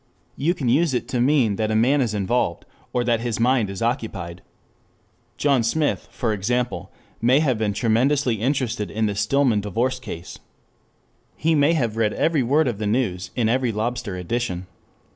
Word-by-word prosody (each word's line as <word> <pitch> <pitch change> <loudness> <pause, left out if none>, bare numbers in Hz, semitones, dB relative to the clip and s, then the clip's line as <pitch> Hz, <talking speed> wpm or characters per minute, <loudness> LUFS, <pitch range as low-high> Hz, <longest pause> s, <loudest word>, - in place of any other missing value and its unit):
You 170 +6 0
can 140 -7 -3
use 140 +3 +3
it - - -2
to 125 - 0
mean 125 -6 +3
that 110 -1 0
a 110 - 0
man 130 +6 +3
is 115 -4 -1
involved, 100 -3 0 0.3
or 125 - 0
that 120 -1 +1
his 115 -1 -3
mind 120 -3 +2
is 95 +3 -4
occupied. 100 -8 -3 1.0
John 140 -4 +3
Smith, 145 +7 0
for 115 -4 -2
example, 120 +5 -2 0.3
may 125 +4 +4
have 130 -7 +1
been 105 -2 0
tremendously 120 +1 +1
interested 120 -5 -1
in 110 +1 -1
the 105 - 0
Stillman 110 +2 +2
divorce 120 +6 -1
case. 90 -8 -8 1.0
He 160 +1 +1
may 150 +1 +4
have 120 -8 -1
read 110 -2 +1
every 160 -3 +1
word 140 +5 +2
of 115 -4 -2
the 105 - -1
news 100 -6 -1
in 120 -3 +1
every 125 +1 +1
lobster 110 -2 -3
edition. 90 -1 -3
120 Hz, 175 wpm, -23 LUFS, 105-130 Hz, 1.0 s, may